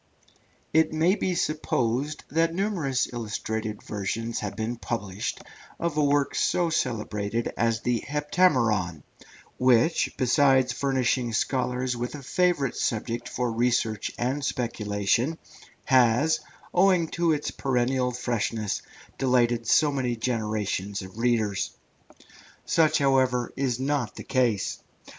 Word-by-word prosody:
It 160 0 +4
may 160 +4 +3
be 185 -3 -1
supposed 145 -3 -1
that 165 +2 +1
numerous 175 -10 0
illustrated 110 -1 -4
editions 110 +3 -3
have 100 -1 -4
been 115 +3 -3
published 105 -5 -4 0.4
of 170 -3 -1
a 150 - +2
work 145 -1 +2
so 175 -2 +1
celebrated 110 -5 -2
as 115 -1 +1
the 120 -1 0
Heptameron, 130 - +1 0.6
which, 125 +5 +3
besides 130 -1 +3
furnishing 130 -3 0
scholars 125 +1 0
with 120 +4 -4
a 140 - -9
favourite 155 -4 +1
subject 115 +1 -2
for 125 -1 -1
research 115 -2 0
and 130 +4 -1
speculation, 115 +2 0 0.5
has, 130 +4 +4 0.3
owing 180 -2 +4
to 170 -1 +1
its 150 -1 -1
perennial 130 -1 0
freshness, 115 -3 -2 0.4
delighted 120 -3 +2
so 150 -2 +4
many 130 -3 -1
generations 105 -4 -2
of 95 +4 -11
readers. 115 -4 0 0.9
Such, 160 -2 +3
however, 130 -3 +2
is 130 -3 -1
not 135 -4 -1
the - - -7
case. 120 -6 0
125 Hz, 115 wpm, -26 LUFS, 115-145 Hz, 0.9 s, It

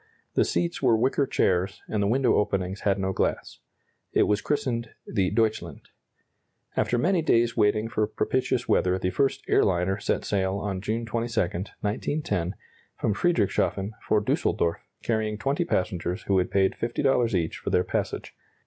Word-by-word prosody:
The - - +3
seats 170 -1 -1
were 120 -4 +4
wicker 130 +4 +1
chairs, 95 -2 0
and 105 - -1
the 100 - +2
window 125 +3 +3
openings 95 -2 -1
had 100 -1 +1
no 95 -1 -1
glass. - - -2 0.5
It - - +4
was 105 0 +1
christened 120 -5 -1 0.2
the 95 -2 0
"Deutschland." 110 +1 -1 0.9
After 120 - +1
many 175 +7 +2
days 115 -6 +2
waiting 105 +1 +2
for 110 -2 0
propitious 125 +2 -1
weather 90 0 +2
the 90 0 -1
first 135 +8 0
"air - - +4
liner" 95 +2 +1
set - - -1
sail 95 -1 0
on 100 -2 -3
June 110 +3 -2
22, 115 +1 -2
1910, 100 - -2 0.4
from 105 - +1
Friedrichshafen 100 - +1
for 105 -1 +1
Düsseldorf, 85 -4 +1 0.3
carrying 110 -2 0
20 140 +10 0
passengers 90 - -1
who 95 -1 +2
had 90 - 0
paid 95 -1 +2
$50 120 -2 +1
each 85 -2 -1
for - - -4
their 90 - +3
passage. - - -3
105 Hz, 160 wpm, -26 LUFS, 95-120 Hz, 0.9 s, were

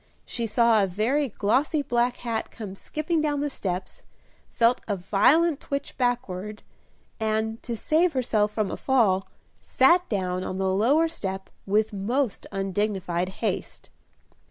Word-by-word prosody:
she 235 -1 -3
saw 225 0 +4
a - - +1
very 245 +10 0
glossy 265 +9 +1
black 245 -1 +1
hat 230 -2 -3
come 205 -4 -8
skipping 310 - -2
down 295 -2 0
the 290 0 -1
steps, 185 -6 -4 0.5
felt 235 +1 +2
a 205 - 0
violent 255 - +3
twitch 280 0 -4
backward, 215 -5 -2 0.6
and, 220 +1 -1
to 235 - -4
save 320 +8 +2
herself 220 -5 +1
from 210 -2 -1
a - - -4
fall, 210 -8 +2 0.3
sat 345 +7 +3
down 185 -3 -1
on 185 - -4
the 190 0 0
lower 275 +12 +3
step 190 -11 -5 0.2
with 215 +2 +1
most 235 +5 -1
undignified 195 -2 -1 0.2
haste. 195 -3 -3
220 Hz, 140 wpm, -26 LUFS, 195-265 Hz, 0.6 s, saw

